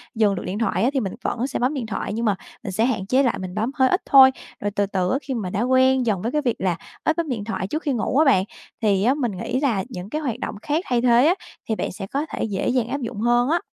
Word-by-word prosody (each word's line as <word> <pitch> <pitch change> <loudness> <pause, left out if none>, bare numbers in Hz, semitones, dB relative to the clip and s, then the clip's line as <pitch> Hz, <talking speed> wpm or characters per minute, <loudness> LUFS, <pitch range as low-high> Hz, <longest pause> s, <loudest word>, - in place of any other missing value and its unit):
dừng 210 -3 +3
được 180 - -5
điện 195 +3 -3
thoại 225 - 0
á, 245 - +4
thì 275 - +1
mình 195 -6 -3
vẫn 240 +3 -1
sẽ 275 - -3
bấm 250 +4 +1
điện 265 -6 -3
thoại 215 -1 -4
nhưng 230 +2 -2
mà 205 -3 +2 0.3
mình - - -4
sẽ 220 +5 +1
hạn 225 -7 -1
chế 260 +7 +3
lại, 245 - +1
mình 185 -1 -6
bấm 220 +4 -1
hơi 260 -1 +4
ít 370 - +1
thôi. 265 -1 +8 0.3
Rồi 205 - -2
từ 205 0 0
từ 185 -2 -1
á, 265 - +2
khi 265 -1 -4
mà 215 -7 -3
đã 195 - -2
quen 260 +1 +3
dần 205 -5 0
với 230 - -2
cái 300 - +1
việc 245 -5 0
là 185 -2 +1 0.3
ít 315 - +1
bấm 335 -3 -1
điện 230 -5 -2
thoại 205 -3 -3
trước 310 +9 -3
khi 290 - 0
ngủ 245 +2 -1
á 315 - +5
bạn, 225 -10 +4 0.4
thì 200 -3 +2
á 250 +4 +4
mình 265 -6 -1
nghĩ 205 +7 -3
là 235 -9 +1
những 190 -5 -7
cái 305 +6 -3
hoạt 245 -5 -3
động - - -4
khác 305 +7 -1
thay 245 -2 +1
thế 240 +1 +5
á 340 - +5 0.4
thì 220 - +1
bạn - - -3
sẽ 195 +1 -7
có 280 +8 -2
thể - - -3
dễ 205 -4 -2
dàng 245 -3 +1
áp 275 +3 -3
dụng 230 -3 -5
hơn 240 +2 +3
á. 335 +2 +3
235 Hz, 305 wpm, -23 LUFS, 205-265 Hz, 0.4 s, thôi